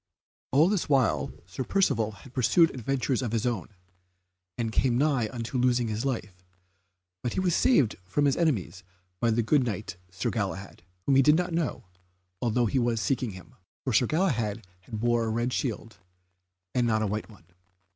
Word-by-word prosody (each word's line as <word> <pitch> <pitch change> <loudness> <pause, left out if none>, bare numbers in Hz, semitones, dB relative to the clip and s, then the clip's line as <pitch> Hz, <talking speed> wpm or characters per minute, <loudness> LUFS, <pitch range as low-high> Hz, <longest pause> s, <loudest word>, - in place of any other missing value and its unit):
All 150 +5 +5
this 195 -5 0
while 135 -5 +2
Sir 95 +8 -5
Percivale 115 - +1
had 130 - -14
pursued 160 +7 +4
adventures 130 +1 -1
of 120 -3 -3
his 115 0 0
own, 115 -8 -2 0.9
and 115 -2 -1
came 120 +1 +2
nigh 135 -6 +2
unto 120 +1 -3
losing 120 -2 +2
his 110 +1 -2
life, 105 -9 -4 0.8
but 120 - -2
he - - -1
was 180 -3 +2
saved 145 - +3
from 145 +11 0
his 140 -1 +3
enemies 100 - -1 0.4
by 120 - +2
the 115 +1 +2
good 135 +4 +3
Knight, 95 -6 -4
Sir 90 +1 -2
Galahad, 100 -3 -4 0.2
whom 135 -1 +4
he - - +7
did 150 +3 +5
not 180 0 -1
know, 165 -2 -1 0.6
although 120 0 +2
he 130 +4 +1
was 120 -2 +1
seeking 125 +2 0
him, 95 +7 -12 0.3
for 130 - -1
Sir 125 - +4
Galahad 120 - 0 0.2
now 110 - -5
bore 120 +1 +1
a - - -1
red 120 +3 -1
shield, 115 -4 -3 0.8
and 120 -1 +2
not 110 -1 +2
a - - +1
white 105 +2 -3
one. 100 -6 -17
120 Hz, 180 wpm, -28 LUFS, 110-135 Hz, 0.9 s, he